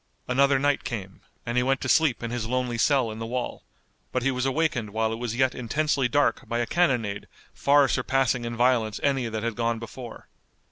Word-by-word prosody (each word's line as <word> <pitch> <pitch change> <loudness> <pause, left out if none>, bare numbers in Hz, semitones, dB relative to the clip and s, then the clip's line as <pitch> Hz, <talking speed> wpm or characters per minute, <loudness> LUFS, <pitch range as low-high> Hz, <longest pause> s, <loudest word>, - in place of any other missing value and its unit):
Another 135 +2 +3
night 145 +1 +1
came, 100 -5 -6 0.2
and 120 +1 -2
he - - +4
went 135 +1 +1
to - - -3
sleep 140 -3 +3
in 115 - -3
his 120 -2 -3
lonely 125 -1 -1
cell 130 -3 +2
in 110 - -8
the 115 - -4
wall, 125 +1 -4 0.5
but 125 - -1
he 135 - +2
was 125 +1 -1
awakened 135 -6 0
while 110 +1 -1
it - - -4
was 120 -2 -3
yet 130 0 +2
intensely 135 +2 0
dark 145 +3 +1
by 115 - -1
a 120 - 0
cannonade 120 - 0 0.3
far 140 0 +4
surpassing 130 -1 +1
in 120 0 -4
violence 120 -4 +2
any 135 -4 +1
that 110 -1 -4
had 115 -1 -1
gone 115 0 0
before. 115 +1 -9
125 Hz, 205 wpm, -26 LUFS, 115-135 Hz, 0.5 s, he